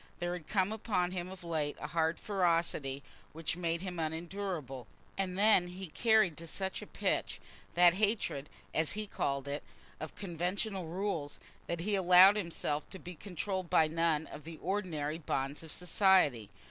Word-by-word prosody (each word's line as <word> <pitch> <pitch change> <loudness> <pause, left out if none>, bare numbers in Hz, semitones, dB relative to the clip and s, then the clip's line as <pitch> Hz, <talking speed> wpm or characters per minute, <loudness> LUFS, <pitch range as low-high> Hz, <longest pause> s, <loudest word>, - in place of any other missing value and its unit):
There 175 0 -2
had 175 -4 -7
come 195 -1 +1
upon 195 -5 0
him 180 -1 -4
of 190 -1 -10
late 155 -3 -1
a - - -5
hard 160 0 0
ferocity 165 -8 0 0.3
which 165 +1 -2
made 170 -1 -1
him 180 -2 -5
unendurable. 160 - -4 0.3
And 185 -1 -2
then 205 -3 +5
he 180 0 -7
carried 215 -4 +3
to 165 - -8
such 190 +3 -3
a - - -9
pitch - - -1 0.4
that 175 0 +7
hatred, 200 -8 0 0.2
as 160 -1 +1
he 215 0 -2
called 140 -8 -2
it, 140 +1 -2 0.4
of 155 - -7
conventional 185 +1 -3
rules, 170 -4 -3 0.3
that 170 -1 -2
he 205 +4 -1
allowed 185 +1 +8
himself 170 -6 -2
to 190 - -8
be 180 -1 -8
controlled 185 +1 -4
by 160 - +5
none 160 -1 +1
of 150 - -10
the 165 0 -9
ordinary 165 -5 -2
bonds 140 -2 -2
of 160 -2 -9
society. 180 - +3
175 Hz, 165 wpm, -33 LUFS, 155-190 Hz, 0.4 s, allowed